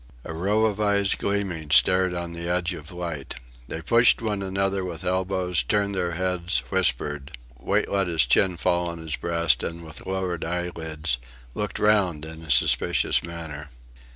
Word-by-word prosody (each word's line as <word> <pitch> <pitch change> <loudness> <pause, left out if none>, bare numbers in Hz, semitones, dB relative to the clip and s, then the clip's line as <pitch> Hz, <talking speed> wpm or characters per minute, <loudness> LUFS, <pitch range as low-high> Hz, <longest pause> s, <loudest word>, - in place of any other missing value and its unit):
A 80 - -5
row 100 +7 +1
of 105 -1 -1
eyes 100 -2 +2
gleaming 95 -6 -2
stared 90 +4 +4
on 85 -1 -4
the 85 0 -4
edge 90 +1 0
of 80 -2 -9
light. 85 -5 -5 0.3
They 80 - -5
pushed 120 0 +5
one 105 -3 -2
another 95 0 -1
with 85 -3 -6
elbows, 90 -1 0
turned 100 -1 0
their 90 -2 -1
heads, 90 -5 0
whispered. 75 -3 0 0.2
Wait 100 +10 0
let 100 -2 0
his 80 -7 +2
chin 90 +8 +3
fall 85 +1 +1
on 85 - -6
his 80 -3 -4
breast 85 -1 +2
and, 85 0 -5
with 80 +2 -8
lowered 95 -3 -2
eyelids, 80 -5 -2 0.3
looked 105 -2 -3
round 95 -8 +2
in 80 0 -8
a 80 - -12
suspicious - - +3
manner. 80 -3 -7
90 Hz, 165 wpm, -25 LUFS, 80-95 Hz, 0.3 s, pushed